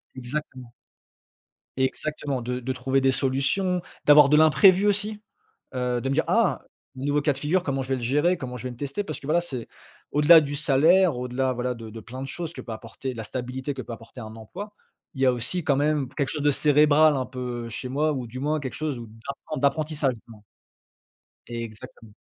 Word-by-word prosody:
exactement 130 -1 -6 1.0
exactement 140 0 -2
de 125 +1 -3
de 130 +1 -3
trouver 130 +1 0
des 135 0 +3
solutions, 140 +8 0 0.2
d'avoir 145 -1 +8
de 150 - +5
l'imprévu 170 +6 +6
aussi, 210 +1 0 0.5
heu, 125 -1 -1
de 135 - -2
me 135 - 0
dire: 160 - +3
«Ah, 230 -4 +2 0.3
nouveau 145 +3 0
cas 145 0 +2
de 135 - -8
figure, 170 +6 0
comment 135 -3 -1
je 130 - -9
vais 135 - +1
le 120 - -6
gérer? 150 +9 +2
Comment 125 -6 -6
je 125 - -9
vais 125 - -3
le 120 - -9
tester?» 140 - -3
parce 155 - -6
que - - -11
voilà, 165 +4 +3
c'est 130 -9 -6 0.5
au-delà 155 +3 +8
du 145 -1 -4
salaire, 155 +4 +4
au-delà, 125 +1 -1
voilà, 125 0 -2
de 115 -1 -9
de 115 +1 -8
plein 130 +4 -8
de 135 - -5
choses 170 +1 -5
que - - -8
peut 115 - -7
apporter 115 +4 -6
la 115 -2 -6
stabilité 130 +4 -4
que 130 - -5
peut 120 - -8
apporter 115 +2 -10
un 110 0 -9
emploi, 200 - -9 0.4
il 135 - -4
y - - +5
a 130 - +5
aussi, 125 +9 -3
quand 145 -3 +2
même, 145 -1 +1
quelque 140 -2 -1
chose 150 +1 -3
de 145 - +4
cérébral 150 0 +5
un 130 -1 -2
peu 125 -2 -5
chez 125 +3 -6
moi 150 +4 +1
ou 130 -4 -4
du 125 +3 -8
moins, 150 +3 0
quelque 130 -5 -5
chose 155 -4 -3
d'apren 115 +6 -7
d'apprentissage, 150 -1 +1
justement. 110 -2 -16 1.0
Exactement. 115 -2 -8
135 Hz, 205 wpm, -25 LUFS, 125-150 Hz, 1.0 s, d'avoir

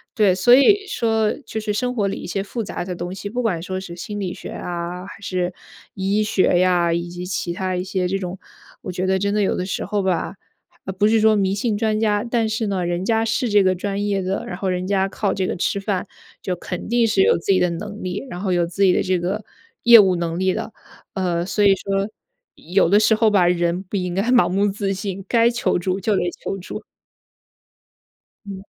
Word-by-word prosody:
对， 200 -4 +4
所 215 +6 +5
以 400 +10 +5
说 220 -2 +1
就 220 -3 -5
是 210 -1 -2
生 250 +3 -1
活 205 -3 +1
里 195 - -3
一 - - -7
些 195 +2 -2
复 225 +3 -4
杂 180 - -5
的 180 -1 -4
东 175 +2 -5
西， 200 +1 -6
不 245 +2 -1
管 185 -8 -1
说 185 +1 -4
是 175 -2 -8
心 205 +4 -6
理 190 -3 -2
学 - - -8
啊 175 +1 -5
还 - - -11
是 180 -2 -2 0.4
医 195 +2 0
学 190 -4 +2
呀， 175 -2 +3
以 170 +1 -2
及 175 +1 -6
其 180 -1 -3
它 185 +1 -2
一 180 - -2
些 185 -1 -1
这 195 +2 -1
种 180 0 -5 0.4
我 185 - -5
觉 185 +1 -2
得 190 0 +2
真 200 +2 -1
的 210 - +1
有 195 - +1
的 180 - -2
时 190 - -3
候 205 +1 -1
吧， 190 +1 -1 0.6
不 210 - +5
是 225 +1 +3
说 220 0 +4
迷 195 -1 +1
信 215 +1 -1
专 215 0 0
家， 210 -1 +1
但 235 -2 0
是 220 0 -1
呢， 190 -3 -1
人 175 +1 -2
家 225 +2 +1
是 225 +1 0
这 205 -1 +4
个 185 0 +3
专 200 +2 -3
业 200 -2 0
的， 190 +2 -2
然 180 - -5
后 190 +1 -2
人 180 0 -1
家 195 0 +1
靠 200 +1 -1
这 190 -1 -1
个 - - -2
吃 195 +2 -1
饭， 195 -2 -2 0.4
就 185 - -1
肯 180 +1 -6
定 235 0 +2
是 200 -3 +3
有 - - +4
自 - - -16
己 185 - +4
的 180 -1 +2
能 205 +5 -6
力， 185 +6 -3
然 175 - -6
后 190 0 -1
有 175 -1 +1
自 190 +3 -1
己 185 - +5
的 - - +2
这 185 -1 +1
个 190 +5 -2 0.4
业 235 -2 +9
务 190 -3 +4
能 170 -1 -2
力 185 0 +1
的。 225 0 -4 0.4
呃， 175 -3 0
所 200 +3 0
以 - - +7
说， 195 +1 -2 0.5
有 180 +1 +1
的 205 +4 +5
时 220 +1 +4
候 220 0 +3
吧， 185 -4 +4
人 175 0 +1
不 195 +1 -4
应 180 -1 -2
该 195 - +1
盲 250 -1 +5
目 195 +3 +1
自 200 0 -2
信， 195 0 -5
该 235 0 +4
求 240 -6 0
助 185 +2 -1
就 210 +2 +1
得 - - +1 0.2
求 - - -2
助。 180 - -7 1.6
嗯。 195 -1 -8
195 Hz, 255 characters per minute, -21 LUFS, 180-210 Hz, 1.6 s, 业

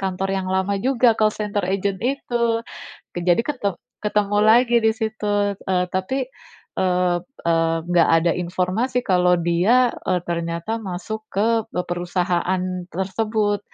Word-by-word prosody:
kantor 190 0 -2
yang 185 -1 -3
lama 190 +1 0
juga 250 -1 +3
call 215 -1 +3
center 210 -2 -2
agent 195 0 -1
itu, 235 -3 0 0.6
ke - - -1
jadi 175 +4 +4
ket 280 -6 -5 0.4
ketemu 205 -1 +1
lagi 240 +2 +5
di 220 0 +3
situ, 205 -2 -1
eee, 180 -1 -1
tapi, 250 +9 -1 0.6
eee 180 -1 +2 0.3
eee, 165 -1 +2
enggak 175 -2 +4
ada 170 - +2
informasi 185 +8 -1
kalau 180 -2 +4
dia, 195 +9 +3 0.2
eee, 180 -1 +2
ternyata 170 +5 -2
masuk 195 +3 -5
ke 225 +3 +1 0.2
perusahaan 175 +1 -1 0.3
tersebut, 205 +3 -1
195 Hz, 130 wpm, -22 LUFS, 180-220 Hz, 0.6 s, lagi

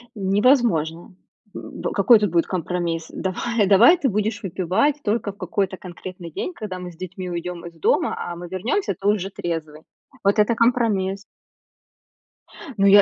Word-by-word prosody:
Невозможно. 195 - +1 0.4
М, - - -8
какой 215 +3 +6
тут 210 -1 +1
будет 170 -1 +2
компромисс? 170 -2 -2
Давай 205 +3 -1
давай, 225 - +7
ты 275 - +1
будешь 215 +1 -1
выпивать 190 - +1
только 210 -1 0
в 195 - -21
какой-то 195 -4 -2
конкретный 180 -1 -9
день, 360 - -4
когда 210 - -6
мы 180 -1 -7
с - - -17
детьми 185 0 -6
уйдём 175 0 -5
из 170 - -9
дома, - - +2
а 175 - -5
мы 175 +1 -8
вернёмся, 200 - -1
ты 195 - -2
уже 200 -2 +1
трезвый. 160 -5 -5 0.4
Вот 200 +2 +3
это 210 +2 +3
компромисс. 215 -5 +1 1.5
Ну, 195 - +3
я 200 +1 +9
190 Hz, 155 wpm, -22 LUFS, 175-215 Hz, 1.5 s, я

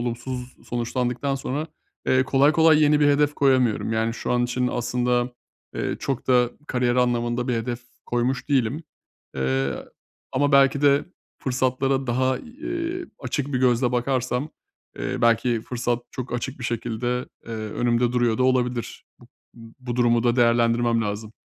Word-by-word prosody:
olumsuz 125 +1 -5
sonuçlandıktan 125 +2 -1
sonra, 135 +3 -3 0.4
eee, 130 0 +4
kolay 140 +3 +4
kolay 160 -1 +5
yeni 150 0 +4
bir 145 - +5
hedef 145 +1 +3
koyamıyorum. 130 -5 +2
Yani, 110 +1 0
şu - - -3
an 120 0 +2
için 125 +1 -1
aslında, 125 0 0 0.4
eee, - - -2
çok 135 -3 -3
da 125 -2 +4 0.2
kariyer 125 -2 0
anlamında 120 0 +1
bir 125 - +1
hedef 115 +1 -3 0.3
koymuş 125 +2 -1
değilim. 135 +2 +1 0.5
Eee, 65 0 0 0.6
ama 145 +2 +1
belki 140 +1 +5
de 140 0 +4 0.3
fırsatlara 130 +1 0
daha, 130 +1 +1
eee, 335 +7 -5
açık 140 +2 -3
bir 125 - +1
gözle 125 -1 +2
bakarsam, 125 +2 -1 0.5
eee, - - -2
belki 115 0 +3
fırsat 120 0 -2
çok 130 0 -6
açık 125 +2 -4
bir 125 - -7
şekilde, 120 +1 -2 0.2
eee, 115 - -6
önümde 120 +2 0
duruyor 120 -3 +1
da - - +2
olabilir. 125 -2 0 0.2
Bu - - -16 0.5
bu 125 -2 -5
durumu 120 -1 +3
da 120 +1 +2
değerlendirmem 115 -1 +3
lazım. 105 +1 -4
125 Hz, 150 wpm, -24 LUFS, 120-135 Hz, 0.6 s, kolay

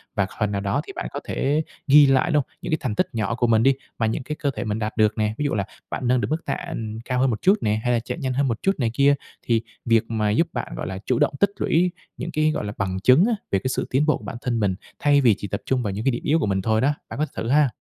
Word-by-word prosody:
và 100 -2 +1
phần 105 -2 +1
nào 100 -1 -1
đó 100 +8 0
thì 195 - -7
bạn - - -4
có 140 - -4
thể 150 +3 0 0.2
ghi 145 +1 +8
lại, 135 +5 +3
đúng 150 - +1
hông? - - -34
Những - - -5
cái 155 - +2
thành 110 -5 -2
tích - - +1
nhỏ 110 0 -1
của 120 -1 +1
mình 115 -1 +4
đi, 135 +1 +5 0.2
mà 115 - +1
những 110 +3 -1
cái 150 +3 -4
cơ 145 -3 -1
thể 125 - -4
mình 110 -1 -2
đạt 110 0 -3
được 110 0 +3
nè. 110 0 0
Ví 150 - -1
dụ 145 - 0
là 100 -3 0 0.2
bạn 125 - -3
nâng 125 0 +3
được - - -1
mức 160 +1 -2
tạ, - - -1
ừm, 110 -8 -5
cao 125 0 -1
hơn 135 +1 +3
một 110 - -2
chút 195 +2 +5
nè, 105 0 +1
hay 125 - +2
là 120 - +2
chạy 120 - -5
nhanh 130 -5 -2
hơn 140 +1 +1
một 115 -2 -2
chút 195 - +3
này 115 -4 +1
kia. 140 +2 +4 0.3
Thì 115 -1 +1 0.2
việc 115 -1 +4
mà 110 -2 +1
giúp 165 +11 +2
bạn, - - -4
gọi - - -4
là, 95 0 -4
chủ 125 - +1
động - - +2
tích 200 - +4
lũy 175 +2 +2 0.3
những 170 - -5
cái, 155 0 +2
gọi 150 - -3
là, 105 - -4
bằng 95 -1 -2
chứng 130 - +5
á, 235 - +2 0.2
về 95 - +2
cái 130 - -2
sự - - -2
tiến 135 +4 +2
bộ 155 -3 +2
của - - -16
bản 130 - -6
thân 120 -3 -1
mình, 100 -3 +1 0.2
thay 145 -1 +4
vì 115 -6 +5
chỉ 100 - -5
tập 100 +3 -4
trung 130 -2 0
vào 100 - -1
những 105 +3 -4
cái 135 - +4
điểm 120 - -4
yếu 160 +3 +2
của - - 0
mình 95 -1 0
thôi 110 +2 +1
đó, 145 +3 +3 0.2
bạn - - -6
có 155 - +2
thử 115 - -3
ha. 145 0 +4
125 Hz, 325 wpm, -23 LUFS, 110-145 Hz, 0.3 s, ghi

